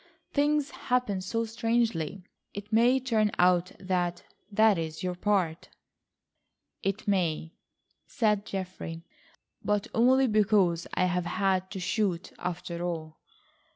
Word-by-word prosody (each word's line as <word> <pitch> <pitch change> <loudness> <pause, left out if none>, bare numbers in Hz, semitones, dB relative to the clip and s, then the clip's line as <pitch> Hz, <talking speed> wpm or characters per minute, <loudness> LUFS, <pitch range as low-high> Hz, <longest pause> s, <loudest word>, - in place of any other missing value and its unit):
Things 290 0 +2
happen 250 -7 -1
so 230 +5 -1
strangely. 225 - -1 0.3
It 205 +2 -7
may 240 +4 +5
turn 225 -5 +1
out 180 0 +3
that 180 -2 -1 0.3
that 215 -2 +4
is 160 +2 -5
your 180 -1 -1
part." 180 -3 0 1.1
"It 195 +2 -2
may," 170 -5 0 0.5
said 210 -3 +1
Geoffrey, 185 -3 -5 0.6
"but 210 -1 +1
only 260 +3 +5
because 205 -6 +2
I 185 - +3
have 180 -1 0
had 190 0 0
to 195 - -6
shoot 185 -2 -1
after 175 -1 -4
all." 160 -3 -4
195 Hz, 120 wpm, -28 LUFS, 175-220 Hz, 1.1 s, may